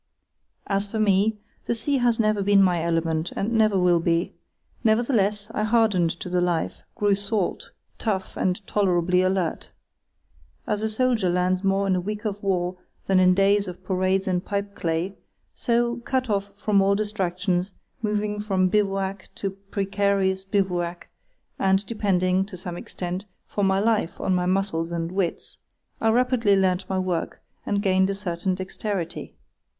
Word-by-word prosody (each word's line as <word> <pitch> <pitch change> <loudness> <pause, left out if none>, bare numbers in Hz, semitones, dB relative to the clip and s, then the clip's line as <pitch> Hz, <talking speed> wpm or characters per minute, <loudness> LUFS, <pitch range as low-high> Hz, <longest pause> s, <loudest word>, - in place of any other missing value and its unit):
As 200 0 -1
for 220 - -4
me, 210 +1 +3 0.3
the 235 - 0
sea 270 +4 +1
has 240 -2 +2
never 215 -2 +2
been 200 0 +5
my 175 -3 +2
element, 165 0 0
and 205 +4 -1
never 215 -3 +3
will 180 -2 +4
be; 165 +1 0 0.5
nevertheless, 220 -2 +2
I - - -1
hardened 215 -6 +3
to - - -5
the 180 0 +1
life, 175 -2 -1
grew 205 -1 +2
salt, 200 -1 -2 0.3
tough, 195 -4 -2
and 185 +2 -1
tolerably 180 -3 +2
alert. 185 -3 -1 0.9
As 210 0 -1
a 220 - 0
soldier 220 -4 +1
learns 180 +1 +1
more 195 0 +2
in 190 -1 +2
a 180 - 0
week 210 +4 -5
of 205 -1 -3
war 180 -2 -1 0.3
than 190 -1 +3
in 185 0 +5
years 200 +1 +3
of 180 +1 -8
parades 185 +1 0
and 180 -1 0
pipeclay, 195 -3 -2 0.4
so, 235 0 +1
cut 255 0 -1
off 200 0 -1
from 200 0 +2
all 195 +1 +3
distractions, 190 -3 -1 0.3
moving 210 -1 -1
from 190 -3 +1
bivouac 195 -1 -1
to 195 - -3
precarious 195 -1 0
bivouac, 180 -3 -1 0.5
and 190 +1 +2
depending, 190 -4 +1
to 195 -2 -9
some 175 -1 -6
extent, 180 +3 -5 0.2
for 205 - -2
my 190 0 +3
life 215 -5 0
on 190 - 0
my 180 0 +1
muscles 185 -3 0
and 170 0 -2
wits, 185 -2 -2 0.4
I 225 - +3
rapidly 240 -3 +3
learnt 185 -1 +1
my 190 - 0
work 185 -3 -2 0.3
and 200 0 0
gained 190 -1 +3
a 195 - -1
certain 185 -1 -2
dexterity. 190 -1 -4
195 Hz, 155 wpm, -24 LUFS, 180-210 Hz, 0.9 s, been